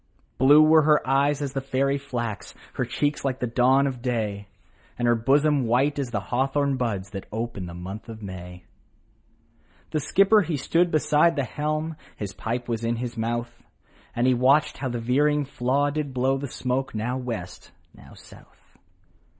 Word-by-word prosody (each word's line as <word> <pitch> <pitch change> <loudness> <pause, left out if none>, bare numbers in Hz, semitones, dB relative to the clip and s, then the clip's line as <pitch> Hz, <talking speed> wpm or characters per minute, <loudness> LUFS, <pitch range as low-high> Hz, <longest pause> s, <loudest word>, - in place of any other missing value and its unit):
Blue 145 +4 +7
were 160 +1 +6
her 150 -2 +3
eyes 140 +2 +2
as 135 -2 -4
the 135 - -2
fairy 135 +1 0
flax, 120 -6 -5 0.2
Her - - -1
cheeks 145 0 -1
like 135 -2 -1
the - - -1
dawn 130 +3 +3
of 130 -3 -3
day, 110 -5 -2 0.5
And 120 - 0
her 120 - +5
bosom 140 +3 +2
white 135 +5 +2
as 135 -3 -2
the 115 -4 -2
hawthorn 135 +5 0
buds, 105 -6 -3
That 100 -3 -7
ope 115 +2 -4
in 90 -2 -5
the 85 - -8
month 95 +6 -8
of 110 -1 -9
May. 90 -2 -8 1.3
The 155 - 0
skipper 195 +8 +4
he 165 -5 -2
stood 170 +6 +1
beside 155 +1 +3
the 140 - 0
helm, 155 +5 -3 0.2
His 100 -3 -5
pipe 115 +6 -4
was 115 -1 -3
in 115 +1 0
his 120 0 -5
mouth, 120 +1 -3 0.5
And 120 - +1
he 130 - +4
watched 135 +5 +3
how 130 - -2
the 120 - -3
veering 145 +5 +1
flaw 140 +2 0
did 145 -3 -4
blow 135 +2 +1
The 140 - -4
smoke 130 0 -3
now 120 +4 -2
West, 115 -8 -6 0.2
now - - -16
South. - - -19
130 Hz, 180 wpm, -25 LUFS, 115-145 Hz, 1.3 s, Blue